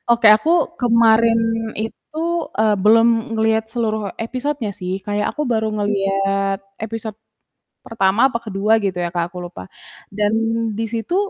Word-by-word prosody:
Oke, 235 Hz, -1 st, +4 dB
aku 305 Hz, +9 st, -2 dB, 0.3 s
kemarin 230 Hz, -1 st, +4 dB, 0.4 s
itu, 225 Hz, +8 st, -6 dB, 0.4 s
eee, 215 Hz, -1 st, +3 dB
belum 225 Hz, +2 st, +6 dB, 0.3 s
ngelihat 220 Hz, 0 st, +1 dB
seluruh 220 Hz, -2 st, -1 dB
episodenya 255 Hz, 0 st, -3 dB
sih. 185 Hz, -1 st, -6 dB
Kayak 205 Hz, 0 st, -1 dB
aku 300 Hz, -, -2 dB
baru 220 Hz, -1 st, 0 dB
ngelihat 195 Hz, -1 st, 0 dB, 0.3 s
episode 220 Hz, -1 st, -6 dB, 0.7 s
pertama 200 Hz, -1 st, 0 dB
apa 235 Hz, -, -1 dB
ke-2 210 Hz, 0 st, 0 dB
gitu 190 Hz, -2 st, -1 dB
ya, -, -, -1 dB
Kak, 170 Hz, 0 st, -1 dB
aku 180 Hz, -, -9 dB
lupa. 175 Hz, -, -9 dB, 0.5 s
Dan 205 Hz, +1 st, 0 dB, 0.5 s
di 225 Hz, -, -1 dB
situ 230 Hz, +9 st, -3 dB
220 Hz, 140 wpm, -19 LUFS, 195-230 Hz, 0.7 s, belum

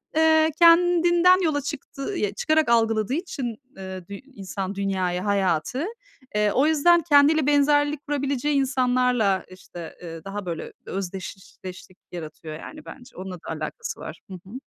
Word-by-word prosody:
eee, 315 Hz, 0 st, +4 dB
kendinden 345 Hz, +1 st, +5 dB
yola 295 Hz, -3 st, +1 dB
çıktı 280 Hz, -1 st, -7 dB, 0.2 s
ya 205 Hz, -7 st, -1 dB
çıkarak 310 Hz, +4 st, +1 dB
algıladığı 225 Hz, 0 st, +2 dB
için, 275 Hz, -, -3 dB, 0.2 s
ııı, 190 Hz, -2 st, -8 dB
dü 200 Hz, -, -9 dB
insan 200 Hz, -5 st, -6 dB
dünyayı, 185 Hz, -2 st, -1 dB
hayatı, 200 Hz, -, 0 dB, 0.5 s
eee, 210 Hz, 0 st, +2 dB
o 270 Hz, +7 st, +3 dB
yüzden 335 Hz, +3 st, +4 dB
kendiyle 290 Hz, 0 st, +5 dB
benzerlik 290 Hz, 0 st, +3 dB
kurabileceği 280 Hz, 0 st, -1 dB
insanlarla 250 Hz, -6 st, +2 dB
işte, 175 Hz, -2 st, -10 dB
ııı, 165 Hz, -2 st, -8 dB
daha 200 Hz, 0 st, -5 dB
böyle 170 Hz, -2 st, -5 dB
özdeşleşlik 190 Hz, -1 st, -7 dB
yaratıyor 155 Hz, -2 st, -8 dB
yani 305 Hz, -, -10 dB
bence. 255 Hz, -1 st, -12 dB
Onunla 185 Hz, 0 st, -6 dB
da 170 Hz, -, -14 dB
alakası 470 Hz, 0 st, -5 dB
var. -, -, -8 dB
Hı -, -, -6 dB
hı. 185 Hz, +3 st, -11 dB
245 Hz, 140 wpm, -24 LUFS, 190-295 Hz, 0.5 s, kendinden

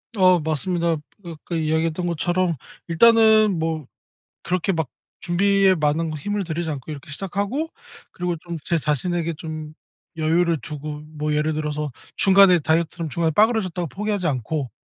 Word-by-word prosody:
어 185 Hz, -3 st, +5 dB
맞습니다. 165 Hz, +2 st, 0 dB, 0.3 s
그 170 Hz, -, -8 dB
아까 165 Hz, +2 st, -7 dB
이야기했던 160 Hz, +2 st, 0 dB
것처럼 175 Hz, +1 st, 0 dB, 0.3 s
일단은 220 Hz, +3 st, +6 dB
뭐 160 Hz, -3 st, -2 dB, 0.6 s
그렇게 180 Hz, +1 st, 0 dB
막 160 Hz, -5 st, -1 dB, 0.3 s
준비에 195 Hz, +2 st, +3 dB
많은 155 Hz, +1 st, 0 dB
힘을 205 Hz, +6 st, -2 dB
들이지 165 Hz, -1 st, -3 dB
않고 140 Hz, 0 st, -6 dB
이렇게 145 Hz, -2 st, -8 dB
시작하고 200 Hz, -, -2 dB, 0.4 s
그리고 180 Hz, -1 st, -2 dB
좀 170 Hz, 0 st, -6 dB
제 170 Hz, -, +1 dB
자신에게 165 Hz, +3 st, -1 dB
좀 155 Hz, -1 st, -7 dB, 0.4 s
여유를 165 Hz, 0 st, +2 dB
두고 150 Hz, 0 st, -6 dB
뭐 150 Hz, -1 st, -2 dB
예를 150 Hz, +1 st, +1 dB
들어서 150 Hz, -1 st, -3 dB, 0.3 s
중간에 190 Hz, -2 st, +6 dB
다이어트를 165 Hz, +2 st, 0 dB
중간에 165 Hz, +2 st, 0 dB
빠그라졌다고 195 Hz, -4 st, +2 dB
포기하지 205 Hz, +1 st, -2 dB
않고 135 Hz, -1 st, -2 dB
165 Hz, 350 characters per minute, -22 LUFS, 155-185 Hz, 0.6 s, 일단은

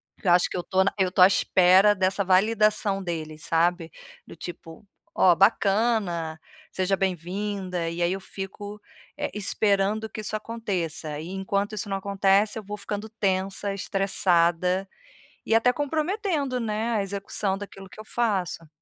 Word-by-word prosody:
Porque -, -, -8 dB
eu 175 Hz, -, +5 dB
acho 180 Hz, -, +4 dB
que -, -, -4 dB
eu -, -, -1 dB
estou 190 Hz, +2 st, +1 dB
na 195 Hz, -, +1 dB
eu 190 Hz, -2 st, +2 dB
estou 180 Hz, 0 st, +5 dB
à -, -, +10 dB
espera 190 Hz, +1 st, +5 dB
dessa 195 Hz, 0 st, 0 dB
validação 205 Hz, 0 st, +3 dB
deles, 155 Hz, -2 st, -5 dB
sabe. 170 Hz, 0 st, +1 dB, 0.3 s
Do -, -, -12 dB
tipo: 165 Hz, +1 st, -9 dB, 0.3 s
"Ó, 180 Hz, -, +5 dB
bacana, 195 Hz, -4 st, +1 dB, 0.3 s
seja 190 Hz, +1 st, 0 dB
bem-vinda", 185 Hz, 0 st, -2 dB
e 170 Hz, +1 st, -4 dB
aí 175 Hz, -, +2 dB
eu 195 Hz, -, -4 dB
fico, 205 Hz, +2 st, -8 dB, 0.3 s
eh, -, -, -3 dB
esperando 210 Hz, +1 st, 0 dB
que 215 Hz, -, -7 dB
isso 215 Hz, +1 st, -2 dB
aconteça, 180 Hz, -9 st, -3 dB
e, 160 Hz, -, -7 dB
enquanto 200 Hz, +2 st, -2 dB
isso 210 Hz, -, -3 dB
não 195 Hz, -1 st, -2 dB
acontece, 200 Hz, +2 st, +2 dB
eu 220 Hz, -, -6 dB
vou 205 Hz, +1 st, -6 dB
ficando 205 Hz, +1 st, -5 dB
tensa, 195 Hz, -1 st, -1 dB
estressada 185 Hz, -1 st, +1 dB, 0.6 s
e 225 Hz, -, +2 dB
até 230 Hz, +2 st, +4 dB
comprometendo, 300 Hz, -, -1 dB
né, 220 Hz, +1 st, -2 dB
a -, -, +1 dB
execução 195 Hz, 0 st, -2 dB
daquilo 195 Hz, -1 st, -10 dB
que -, -, -14 dB
eu -, -, -7 dB
faço. 195 Hz, -9 st, -1 dB
195 Hz, 160 wpm, -25 LUFS, 180-210 Hz, 0.6 s, à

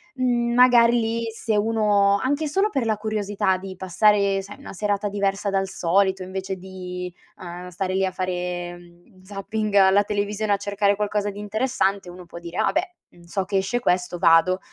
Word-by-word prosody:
mhmm, 240 Hz, -2 st, 0 dB
magari 240 Hz, -1 st, +6 dB
lì 230 Hz, +1 st, -1 dB
se 220 Hz, -1 st, -2 dB
uno, 205 Hz, -2 st, +3 dB
anche 285 Hz, +6 st, -1 dB
solo 390 Hz, +8 st, +1 dB
per 260 Hz, -4 st, -1 dB
la 215 Hz, -, +1 dB
curiosità 205 Hz, -3 st, -1 dB
di 190 Hz, 0 st, -8 dB
passare, 195 Hz, +1 st, +2 dB
sai, 200 Hz, +2 st, -11 dB
una -, -, -10 dB
serata 205 Hz, +1 st, -1 dB
diversa 200 Hz, 0 st, -1 dB
dal 195 Hz, 0 st, 0 dB
solito, 190 Hz, +1 st, +1 dB
invece 190 Hz, +1 st, -5 dB
di, 180 Hz, -1 st, -7 dB, 0.2 s
uhm, 180 Hz, 0 st, -8 dB
stare 185 Hz, +1 st, -3 dB
lì 190 Hz, 0 st, +1 dB
a 190 Hz, -, +1 dB
fare, 180 Hz, -1 st, -3 dB
mhmm, 175 Hz, +3 st, -20 dB
zapping 205 Hz, +2 st, -4 dB
alla 195 Hz, +1 st, +5 dB
televisione 205 Hz, 0 st, -1 dB
a -, -, +2 dB
cercare 200 Hz, 0 st, 0 dB
qualcosa 205 Hz, 0 st, -1 dB
di 200 Hz, -, -9 dB
interessante, 205 Hz, -3 st, -1 dB
uno 180 Hz, 0 st, -11 dB
può 170 Hz, 0 st, -10 dB
dire: 170 Hz, 0 st, -8 dB
"Ah -, -, +2 dB
beh, 360 Hz, -1 st, -2 dB
mhmm, 175 Hz, -, -20 dB
so 185 Hz, +2 st, -3 dB
che 195 Hz, 0 st, -1 dB
esce 190 Hz, +6 st, 0 dB
questo, 180 Hz, -5 st, 0 dB
vado." 170 Hz, +3 st, +4 dB
200 Hz, 185 wpm, -23 LUFS, 185-215 Hz, 0.2 s, magari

